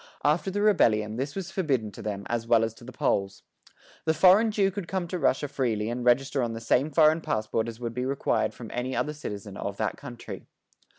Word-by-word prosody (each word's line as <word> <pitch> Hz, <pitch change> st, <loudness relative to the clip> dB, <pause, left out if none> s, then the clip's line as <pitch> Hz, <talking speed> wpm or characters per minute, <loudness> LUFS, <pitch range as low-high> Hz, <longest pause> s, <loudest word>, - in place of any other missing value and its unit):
After 155 Hz, +6 st, +2 dB
the 205 Hz, +2 st, -1 dB
rebellion 110 Hz, -, +3 dB
this 140 Hz, +3 st, -3 dB
was 190 Hz, -1 st, -5 dB
forbidden 135 Hz, -, 0 dB
to -, -, -10 dB
them 100 Hz, -1 st, -4 dB
as 115 Hz, -1 st, -2 dB
well 115 Hz, -1 st, +4 dB
as 110 Hz, -1 st, -1 dB
to 115 Hz, -, -16 dB
the 125 Hz, -, -9 dB
Poles. 100 Hz, -5 st, -1 dB, 0.6 s
The 160 Hz, 0 st, +2 dB
foreign 190 Hz, +7 st, +6 dB
Jew 200 Hz, -2 st, +2 dB
could 190 Hz, -2 st, -5 dB
come 185 Hz, -1 st, -2 dB
to 180 Hz, +1 st, -3 dB
Russia 140 Hz, 0 st, +1 dB
freely 115 Hz, -5 st, -1 dB
and 120 Hz, +1 st, -3 dB
register 135 Hz, +3 st, +2 dB
on 120 Hz, -2 st, -1 dB
the 115 Hz, -, -5 dB
same 125 Hz, +5 st, +2 dB
foreign 155 Hz, +1 st, +4 dB
passport 110 Hz, -2 st, -1 dB
as 115 Hz, 0 st, -7 dB
would 120 Hz, -2 st, -4 dB
be 125 Hz, +1 st, -2 dB
required 135 Hz, 0 st, 0 dB
from -, -, -9 dB
any 125 Hz, +2 st, -2 dB
other 150 Hz, -, -1 dB
citizen 105 Hz, -9 st, -7 dB
of -, -, -4 dB
that -, -, -2 dB
country. -, -, -9 dB
130 Hz, 220 wpm, -27 LUFS, 115-165 Hz, 0.6 s, foreign